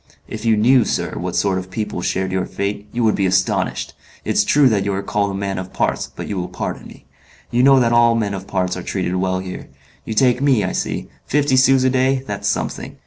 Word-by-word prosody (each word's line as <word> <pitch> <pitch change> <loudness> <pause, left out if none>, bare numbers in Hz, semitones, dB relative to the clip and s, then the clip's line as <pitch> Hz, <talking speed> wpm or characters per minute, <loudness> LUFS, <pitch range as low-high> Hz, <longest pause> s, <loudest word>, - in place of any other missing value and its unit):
If 110 +1 -7
you 110 -1 +3
knew, 125 +3 +5
sir, - - -2
what 90 0 -4
sort 95 +1 +1
of 95 0 -9
people 105 -2 -4
shared 95 +1 -1
your 95 0 -1
fate, 100 +1 -4
you 120 0 -1
would 110 - +3
be 95 - +1
astonished, 95 0 0 0.3
It's - - +2
true 145 -2 +4
that 105 -5 +2
you 100 - -1
are 100 - -3
called 100 0 0
a - - -4
man 95 -1 -3
of 95 0 -8
parts; - - -1
but - - -6
you 100 - -4
will 90 -1 -2
pardon 90 - -5
me.... - - -15 0.5
You 120 - +2
know 135 0 +6
that 120 -1 +2
all 120 0 +5
men 105 -3 -1
of 95 0 -6
parts 90 -1 -1
are 90 - -5
treated 90 0 -3
well 95 0 0
here. 90 -1 -8 0.3
You 110 - -5
take 125 +1 +3
me, 135 -7 +3
I - - -1
see. - - -3 0.2
Fifty 145 -1 +2
sous 130 0 +4
a 130 - +3
day, 130 0 +1
that's - - -4
something. - - -3
105 Hz, 240 wpm, -19 LUFS, 95-125 Hz, 0.5 s, know